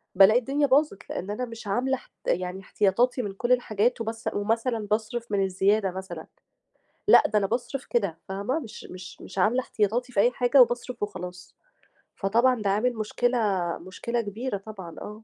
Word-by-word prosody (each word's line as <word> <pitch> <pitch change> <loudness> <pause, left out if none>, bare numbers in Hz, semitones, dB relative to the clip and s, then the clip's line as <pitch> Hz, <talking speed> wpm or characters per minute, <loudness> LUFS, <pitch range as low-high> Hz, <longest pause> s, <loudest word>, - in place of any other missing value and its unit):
بالاقي 200 +5 +7
الدنيا 280 +3 0
باظت؛ 280 -4 +3
لأن 195 +3 -4
أنا 250 +4 -2
مش 230 -2 -10
عاملة 255 +6 +1
اح - - -14 0.2
يعني 180 +1 -1
احتياطاتي 235 +7 +1
من 200 -3 -4
كل 240 +5 -2
الحاجات 235 -1 +2
وبس 225 0 -3
ومثلًا 225 +1 -1
باصرف 220 +1 -1
من 195 -1 +2
الزيادة 195 +1 +2
مثلًا، 180 -3 -7 0.8
لأ - - +9
ده 215 - +2
أنا 195 - +1
باصرف 250 +4 -3
كده 200 -9 0
فاهمة؟ 200 +10 -1
مش 230 -6 -10
مش 185 0 -10
مش 190 - -9
عاملة 220 +7 +3
احتياطاتي 240 +2 -1
في 200 - +2
أي 240 - +5
حاجة 250 +1 +5
وباصرف 240 -1 -1
وخلاص، 180 -3 -6 0.6
فطبعًا 235 +4 +2
ده 200 - 0
عامل 230 +5 +1
مشكلة، 240 +3 0 0.4
مشكلة 230 +6 -3
كبيرة 215 +2 -4
طبعًا، 195 -4 -9
آه. 210 +1 -8
215 Hz, 170 wpm, -26 LUFS, 195-245 Hz, 0.8 s, لأ